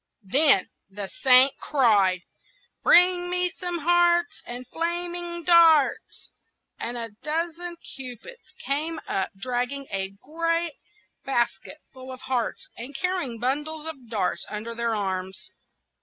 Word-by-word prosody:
Then 270 +1 +5 0.2
the 195 0 -6
Saint 260 +1 +7
cried,— 205 -10 +2 0.6
"Bring 355 0 +5
me 360 0 0
some 355 -1 -4
hearts, 345 +1 +2
And 245 +1 -7
flaming 345 +2 -3
darts!" 325 -4 +4 0.5
and 240 +1 -3
a 230 -2 -5
dozen 335 +3 -3 0.2
cupids 265 - -10
came 315 +4 -2
up, 190 - -1
dragging 250 +4 -2
a 190 -1 -2
great 335 +2 -1 0.5
basket 240 0 -2 0.2
full 260 0 -10
of 255 0 -10
hearts, 250 -4 -2
and 250 +4 -9
carrying 355 -7 -2
bundles 295 +5 -2
of 275 -8 -9
darts 220 -3 -1
under 215 +2 -5
their 230 -1 -1
arms. 190 -2 -4
275 Hz, 120 wpm, -25 LUFS, 235-340 Hz, 0.6 s, Saint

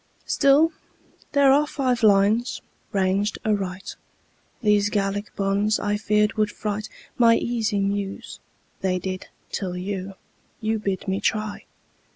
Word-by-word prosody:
Still, 290 +4 +4 0.6
there 280 -2 +5
are 295 +2 +4
five 255 -5 0
lines 210 +3 +3 0.3
ranged 200 +1 +1
aright. 195 -2 -2 0.7
These 205 -1 +3
Gallic 205 0 -1
bonds, 200 +2 +1
I 205 0 0
feared, 210 0 +2
would 215 -1 +2
fright 210 0 -4 0.3
My 230 -1 +6
easy 225 -4 0
Muse. 200 0 -3 0.4
They 185 -1 0
did, 185 +1 -5 0.2
till 180 -3 -3
you 190 +1 -4 0.4
You 220 -1 -1
bid 195 -3 -3
me 190 +1 0
try! 215 -1 -1
205 Hz, 125 wpm, -24 LUFS, 195-220 Hz, 0.7 s, My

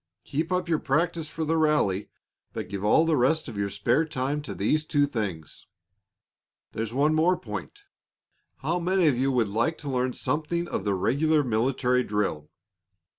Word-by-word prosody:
Keep 160 +5 -3
up 180 0 0
your 160 -2 +1
practice 165 +3 0
for 160 +1 -4
the 160 +1 +1
rally, 150 -12 +1 0.4
but - - -5
give 100 0 -5
all 135 +10 +4
the 165 -1 +2
rest 155 +5 +2
of - - -7
your 100 0 -1
spare 100 +10 +1
time 145 -1 -2
to 150 - -7
these 155 0 +1
two 145 -2 +2
things. 95 - -5 1.0
There's 110 0 -4
one 145 +5 +2
more 165 +4 +3
point. 410 0 -7 0.8
How 175 - 0
many 180 +1 +2
of 145 -5 +4
you 135 +1 +2
would 120 -5 +1
like 115 +10 0
to 145 -3 -5
learn 125 0 0
something 170 +3 -2
of 100 - -3
the 100 -1 +1
regular 150 +10 +2
military 125 +1 +1
drill? 105 -9 -2
145 Hz, 175 wpm, -26 LUFS, 110-160 Hz, 1.0 s, all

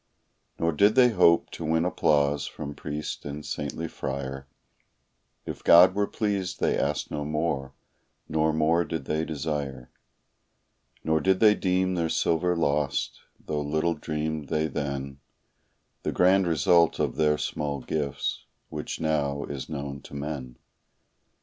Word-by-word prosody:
Nor 85 0 +1
did 100 +7 +4
they 125 -1 +7
hope 90 -6 +4
to - - -7
win 80 +1 +1
applause 75 -4 +2
from 70 -1 -6
priest 75 +1 -5
and 70 +1 -6
saintly 75 +3 -4
friar; 70 -2 -5 1.0
If - - -7
God 85 +2 +8
were 100 0 0
pleased 100 -4 -2
they - - +2
asked 70 0 -1
no 75 - -3
more, 75 -3 -2 0.5
nor 80 0 +1
more 80 +2 +2
did 80 -3 -5
they 80 +3 -1
desire; 70 -4 -4 1.1
Nor 80 0 +2
did 95 0 +2
they 105 -1 +7
deem 95 -2 +1
their 85 -2 0
silver 90 +3 +1
lost, 70 -4 0 0.3
though 75 -1 -2
little 80 +3 0
dreamed 75 -1 -3
they 75 0 +1
then 70 -2 -4 0.8
The - - -2
grand 95 +1 +4
result 85 +1 +4
of - - -1
their 75 -1 +2
small 70 -2 -3
gifts, 70 +1 -3 0.2
which - - -5
now 70 -3 0
is 70 -2 -6
known 70 -2 -5
to - - -12
men. 70 -4 -5
75 Hz, 140 wpm, -27 LUFS, 70-85 Hz, 1.1 s, God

